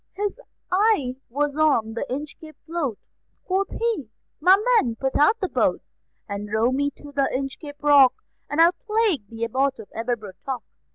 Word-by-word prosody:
His 410 +4 -3 0.3
eye 365 - +2
was 285 +3 -1
on 285 -8 +2
the 235 +5 -4
Inchcape 305 +3 -6
float; 310 -9 -2 0.5
Quoth 390 +1 0
he: 445 - -1 0.3
"My 370 +5 +6 0.2
men, 235 - -1
put 265 +3 -2
out 365 +10 +4
the 380 - -1
boat, - - 0 0.4
And 205 0 -5
row 220 +3 +2
me 285 +2 +1
to 290 - -12
the 275 -1 +1
Inchcape 275 +3 -5
Rock, 280 -3 +6 0.3
And 290 - -2
I'll 335 +1 +7
plague 420 - 0
the 230 0 -3
Abbot 265 +4 0
of 220 - -12
Aberbrothock." 230 +1 -4
285 Hz, 160 wpm, -24 LUFS, 240-335 Hz, 0.5 s, I'll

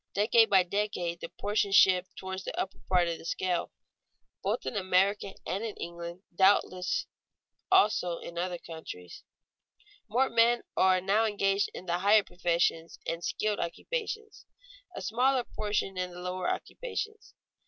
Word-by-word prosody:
Decade 225 +2 +5
by 190 -2 +6
decade 180 -3 -2
the - - -5
proportion 205 -1 -1
shifts 185 -1 +5
toward 190 0 -5
the - - -5
upper 195 - -3
part 180 -2 +4
of 170 -1 -3
the - - -12
scale. 180 0 -1 0.7
Both - - -1
in - - -3
America 195 +1 +1
and 195 +4 -2
in 220 -3 -4
England 170 +2 -7
(doubtless 185 -1 +3 0.7
also 210 - +4
in 170 - -9
other 175 +1 -2
countries) 160 - -9 0.9
more 255 +5 +2
men 235 0 +3
are 185 -1 +4
now 205 +4 +2
engaged 200 -1 +1
in 185 - -8
the 175 0 0
higher 205 +2 +5
professions 170 -2 0
and 165 +1 -3
skilled 215 -1 -1
occupations, 445 - -4 0.5
a - - -5
smaller 255 +2 +2
proportion 205 -4 -2
in 180 0 -1
the 175 0 -10
lower 180 0 -2
occupations. 440 -3 -5
190 Hz, 145 wpm, -30 LUFS, 175-215 Hz, 0.9 s, by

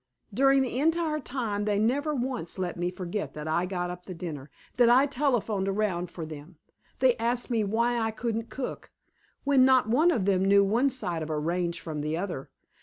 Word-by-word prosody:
During 270 +3 +4
the 255 0 -2
entire 320 0 +1
time 230 -7 -3
they 210 -1 +1
never 280 +8 +1
once 245 -10 -3
let 180 -2 -2
me 175 0 -1
forget 180 +2 -5
that 150 0 -6
I 170 +3 0
got 180 -1 -3
up 180 0 -10
the 185 - -6
dinner, 155 -5 -6 0.3
that 240 -1 +6
I 255 +3 +6
telephoned 245 -8 0
around 195 -3 -1
for 170 -2 -7
them. 155 +2 -10 0.4
They 255 -2 +4
asked 240 +2 -1
me 225 -2 +2
why 235 +4 +1
I 225 -1 0
couldn't 225 0 -3
cook 260 -2 -6 0.5
when 275 -2 +4
not 255 -4 +4
one 300 +9 +4
of 230 - +1
them 190 -2 +2
knew 200 +1 +5
one 235 +8 +2
side 185 -11 -3
of 155 - -5
a 155 - -1
range 170 +2 -1
from 155 -3 -5
the 155 +2 -2
other. 175 -7 -4
210 Hz, 200 wpm, -28 LUFS, 175-255 Hz, 0.5 s, that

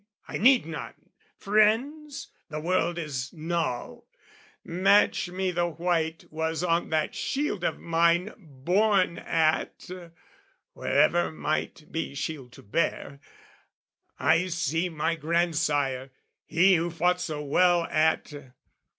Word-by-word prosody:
I - - -4
need 255 - +5
none 165 - -9 0.3
'Friends?' 255 +8 +1 0.2
The 155 -1 -4
word 175 +1 0
is 140 -5 -4
null. 165 -6 -3 0.6
"Match 185 +1 +3
me 185 +1 -2
the 175 0 0
white 165 -1 -1
was 160 +2 -2
on 170 -1 +1
that 155 -1 0
shield 270 - -2
of - - 0
mine 170 +4 +1
"Borne 180 - 0
at"...wherever 165 -1 -1
might 155 0 -3
be 160 -3 -4
shield 140 -3 -5
to - - -14
bear; 140 +3 -2 1.0
"I 180 +3 +2
see 165 0 -1
my 160 0 -1
grandsire, 150 -5 0 0.4
he 185 +4 +4
who 170 +2 -1
fought 180 +2 +1
so 150 -4 -4
well 175 +4 +3
"At"... 155 -1 +1
170 Hz, 110 wpm, -27 LUFS, 155-180 Hz, 1.0 s, need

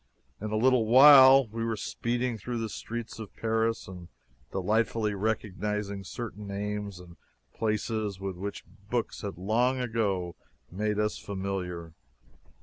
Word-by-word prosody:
In 110 - -3
a 110 - -1
little 125 -1 +3
while 135 +1 +9
we 115 +2 -4
were 115 -1 -1
speeding 120 +3 -2
through 120 +3 -5
the 115 -1 -3
streets 115 +1 -6
of 110 -3 -9
Paris 115 0 0
and 90 -2 -9 0.4
delightfully 105 +2 0
recognizing 105 -1 -2
certain 105 0 -7
names 100 -1 -4
and 85 -1 -14 0.4
places 110 -2 -2
with 95 -1 -4
which 100 +3 -6 0.2
books 120 -1 -2
had 100 -4 -5
long 120 +7 +1
ago 100 -8 -1 0.4
made 105 +3 -1
us 105 0 0
familiar. 95 -4 -4
105 Hz, 135 wpm, -28 LUFS, 100-115 Hz, 0.4 s, while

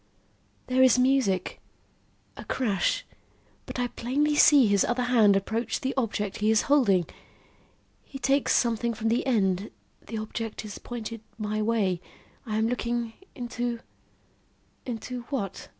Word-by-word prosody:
"There 255 +1 +2
is 260 -1 +6
music 250 -8 +1 0.7
a - - -9
crash 205 -8 0 0.6
but - - -6
I 245 - +1
plainly 275 +5 0
see 290 -2 +7
his 200 -2 +3
other 245 +1 0
hand 225 -5 +4
approach 220 +3 -1
the 265 0 -1
object 210 -6 -2
he 210 +1 +1
is 220 -1 +4
holding. 205 -12 +3 1.0
He 275 - -9
takes 275 +1 +2
something 235 -1 +1
from 225 +1 -1
the 235 +2 +1
end 195 -5 +1 0.4
the 225 - -5
object 220 0 -5
is 205 - -8
pointed 230 -2 -6 0.2
my 215 0 -2
way 210 -5 0 0.5
I 215 -1 -1
am 220 +1 +2
looking 235 -1 -2 0.2
into 240 -2 -3 1.1
into 245 +1 -5
what? 200 -9 -4
230 Hz, 135 wpm, -27 LUFS, 210-250 Hz, 1.1 s, see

